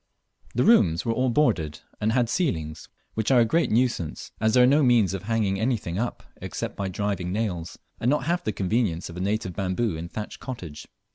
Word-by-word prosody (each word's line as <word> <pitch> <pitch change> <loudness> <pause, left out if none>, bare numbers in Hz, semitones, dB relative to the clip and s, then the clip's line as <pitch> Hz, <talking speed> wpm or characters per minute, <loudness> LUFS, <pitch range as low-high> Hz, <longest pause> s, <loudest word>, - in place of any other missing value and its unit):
The - - +3
rooms 90 - +4
were 115 - +1
all 130 +2 +1
boarded, 105 - +1 0.2
and 110 +1 +1
had 120 0 +2
ceilings, 80 - -2 0.2
which 110 -1 -1
are 130 -2 +6
a - - +5
great 165 +9 +2
nuisance, 115 -9 0
as 110 +1 +3
there 125 - +7
are - - +7
no 140 +4 +5
means 120 -8 +4
of 95 - -3
hanging 105 -4 0
anything 110 -7 -1
up 120 +1 -3
except - - -5
by 100 - -2
driving 95 -2 -2
nails, 95 -6 -3 0.2
and 120 - +1
not 145 -1 +2
half 170 +4 0
the 110 - -1
conveniences 95 -4 -1
of 85 - -10
a - - -3
native 100 -1 -1
bamboo 95 +2 -1
and 85 +2 -7
thatch 105 -1 -6
cottage. 90 - -7
110 Hz, 205 wpm, -25 LUFS, 90-120 Hz, 0.2 s, there